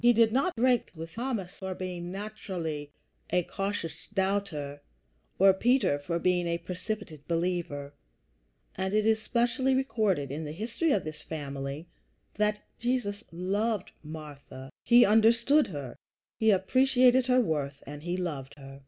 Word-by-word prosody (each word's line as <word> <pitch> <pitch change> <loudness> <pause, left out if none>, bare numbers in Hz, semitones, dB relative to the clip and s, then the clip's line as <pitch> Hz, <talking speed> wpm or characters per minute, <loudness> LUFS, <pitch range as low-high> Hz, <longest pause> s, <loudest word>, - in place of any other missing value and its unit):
He 240 0 +7
did 225 -1 +4
not 275 +7 +1
break 245 0 +2
with 165 +1 -8
Thomas 230 -7 -3
for 190 -1 -6
being 180 -1 -5
naturally 180 -7 -5 0.4
a 180 - +2
cautious 180 -4 -4
doubter, 190 -8 -1 0.6
or 195 0 +7
Peter 235 - +2
for 170 +4 -2
being 175 0 +1
a 170 0 0
precipitate 180 -3 -6
believer; 165 -5 -2 0.8
and 190 +2 -2
it 215 0 +3
is 220 0 +3
specially 240 +3 +1
recorded 210 - 0
in 150 +3 -4
the 150 0 -5
history 230 - -1
of 200 - +2
this 155 -1 -7
family 140 0 -5 0.5
that 210 0 0 0.2
Jesus 235 -4 -1
loved 200 +4 -1
Martha. 145 -4 -9
He 240 +1 +7
understood 230 +7 +5
her, 140 -7 -6 0.4
he 220 - +4
appreciated 255 +5 +4
her 255 0 +5
worth, 145 - -1
and 145 +1 -8
he 175 +3 -2
loved 150 -7 -4
her. 135 -1 -11
185 Hz, 145 wpm, -29 LUFS, 155-225 Hz, 0.8 s, He